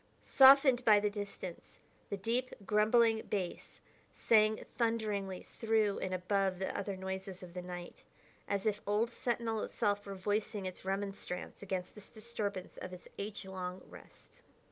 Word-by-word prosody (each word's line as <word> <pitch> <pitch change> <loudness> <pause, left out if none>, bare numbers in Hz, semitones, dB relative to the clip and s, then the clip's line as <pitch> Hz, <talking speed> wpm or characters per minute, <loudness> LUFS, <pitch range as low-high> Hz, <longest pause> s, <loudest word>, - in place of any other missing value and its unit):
Softened 265 -2 +7
by 215 -3 +7
the 205 0 0
distance, 200 -4 -6 0.3
the 200 - -2
deep, 240 +6 -1
grumbling 220 +2 +4
bass 185 -4 -4 0.3
sang 215 -1 +3
thunderingly 210 -5 -1
through 220 -3 +1
and 185 - -3
above 185 +1 0
the 190 - -3
other 200 -1 -3
noises 190 0 -5
of 175 -1 -10
the 180 - -4
night, 175 -1 -8 0.4
as 200 0 -1
if 210 -1 +1
old 215 +3 +2
Sentinel 230 -2 -1
itself 205 -2 0
were 200 - -5
voicing 205 +1 -1
its 185 -1 -6
remonstrance 195 -2 -4
against 185 -2 -3
this 210 -1 -13
disturbance 215 -4 -5
of 185 - -7
its 180 - -10
age 200 0 -5
long 185 -1 -5
rest. - - -15
205 Hz, 145 wpm, -34 LUFS, 190-220 Hz, 0.4 s, Softened